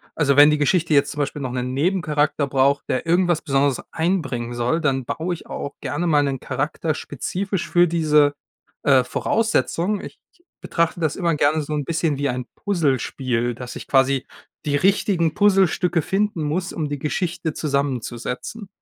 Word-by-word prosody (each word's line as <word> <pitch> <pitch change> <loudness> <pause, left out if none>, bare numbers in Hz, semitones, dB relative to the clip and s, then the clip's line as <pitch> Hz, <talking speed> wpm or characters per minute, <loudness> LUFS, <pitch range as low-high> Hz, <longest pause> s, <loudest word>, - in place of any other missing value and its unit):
also, 140 -3 +2
wenn 145 +1 +9
die 150 - +2
Geschichte 160 +2 +1
jetzt 140 -1 +3
zum 145 - -7
Beispiel 145 0 -2
noch 130 -2 -3
'nen 125 0 -3
Nebencharakter 150 -2 +1
braucht, 140 +1 +2
der 130 - -1
irgendwas 175 -1 +2
Besonderes 140 -2 +1
einbringen 140 -9 -1
soll, 120 +7 0
dann 135 -4 0
baue 170 +7 -2
ich 170 - -9
auch 140 - -5
gerne 145 +6 -2
mal 150 -2 +4
'nen 135 -2 -2
Charakter 145 +4 -2
spezifisch 185 +7 -4
für 175 0 +4
diese, 150 -3 +3 0.5
äh, 130 -3 +5
Voraussetzung. 210 - 0
Ich - - -10 0.4
betrachte 170 0 0
das 155 -1 0
immer 170 -4 +1
gerne 150 +2 +2
so 150 +1 -5
'n 145 -2 -2
bisschen 165 -3 0
wie 145 - 0
ein 125 0 -3
Puzzlespiel, 130 - -1
dass 125 0 -8
ich - - -9
quasi 135 -1 +2 0.4
die 145 -1 +1
richtigen 180 -2 +2
Puzzlestücke 190 -4 +3
finden 195 -1 -1
muss, 170 +5 -2
um 155 -3 -3
die 145 -1 -4
Geschichte 165 +1 -2
zusammenzusetzen. 140 - -3
150 Hz, 165 wpm, -22 LUFS, 135-170 Hz, 0.5 s, wenn